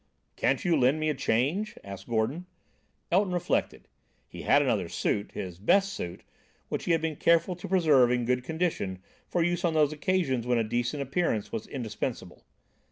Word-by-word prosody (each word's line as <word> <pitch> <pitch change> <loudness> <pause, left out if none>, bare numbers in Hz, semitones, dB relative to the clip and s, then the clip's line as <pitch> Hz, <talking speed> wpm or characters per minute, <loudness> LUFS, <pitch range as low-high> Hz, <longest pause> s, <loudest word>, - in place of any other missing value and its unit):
"Can't - - 0
you 175 -2 +3
lend 135 +2 +3
me 155 0 0
a - - +1
change?" 140 - 0
asked 100 -1 -9
Gordon. 120 +11 -1 0.6
Elton 185 +1 +2
reflected. 175 - -1 0.4
He - - -9
had - - +4
another - - 0
suit, 100 - -1
his 90 -2 -6
best 195 - +3
suit, 85 - -6 0.5
which - - -3
he - - +1
had 165 - +2
been 160 -2 -2
careful 170 +2 +3
to 175 - -8
preserve 155 -9 +4
in 125 -1 +1
good 125 +1 0
condition 140 - -2 0.3
for 175 - +1
use 175 0 0
on 170 -2 +1
those 155 -1 +3
occasions 150 -7 0
when 125 -1 +2
a 115 - +2
decent 120 +6 -1
appearance 135 - -1
was 110 - -4
indispensable. 110 -6 -5
145 Hz, 175 wpm, -28 LUFS, 115-175 Hz, 0.6 s, had